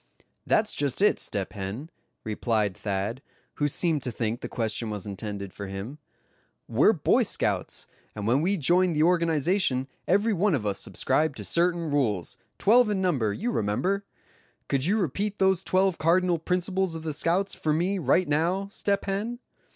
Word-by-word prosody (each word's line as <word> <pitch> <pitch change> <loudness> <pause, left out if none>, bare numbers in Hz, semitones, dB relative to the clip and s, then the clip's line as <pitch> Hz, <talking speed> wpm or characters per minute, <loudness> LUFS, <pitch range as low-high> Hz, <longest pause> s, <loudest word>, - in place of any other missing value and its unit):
"That's 215 0 +2
just 140 -3 -1
it, 210 - +4
Step 100 -2 -3
Hen," 105 - -6 0.3
replied 110 -2 0
Thad, 100 +6 -3 0.4
who 145 - +2
seemed 155 +1 0
to 125 - -3
think 115 0 -2
the - - -5
question 110 -1 -2
was 105 -3 -5
intended 100 -1 -6
for 100 - -6
him; 100 +10 -6 0.7
"we're - - +4
Boy - - +2
Scouts, - - -1 0.3
and 105 -1 -4
when 125 +6 +3
we 195 +5 +1
joined 175 +3 +3
the 150 - +3
organization 165 -4 +2 0.2
every 205 +4 +3
one 195 -1 +2
of 115 -6 -3
us 100 -1 -1
subscribed 135 - 0
to - - -6
certain 170 -2 +1
rules, 110 - 0 0.2
twelve 235 +2 +5
in 205 -2 0
number, 140 - +1
you 230 - -2
remember. 185 - 0 0.6
Could 135 0 0
you 200 +6 +2
repeat 200 +3 -1
those 190 -1 +2
twelve 190 -1 +2
cardinal 175 +1 +3
principles 180 +1 -1
of 160 - -6
the 155 -1 -3
scouts 180 +6 0
for 155 - -1
me 180 +6 +1
right 175 +4 +2
now, 175 +7 0
Step 200 0 -1
Hen?" 205 +5 -2
160 Hz, 165 wpm, -27 LUFS, 115-190 Hz, 0.7 s, twelve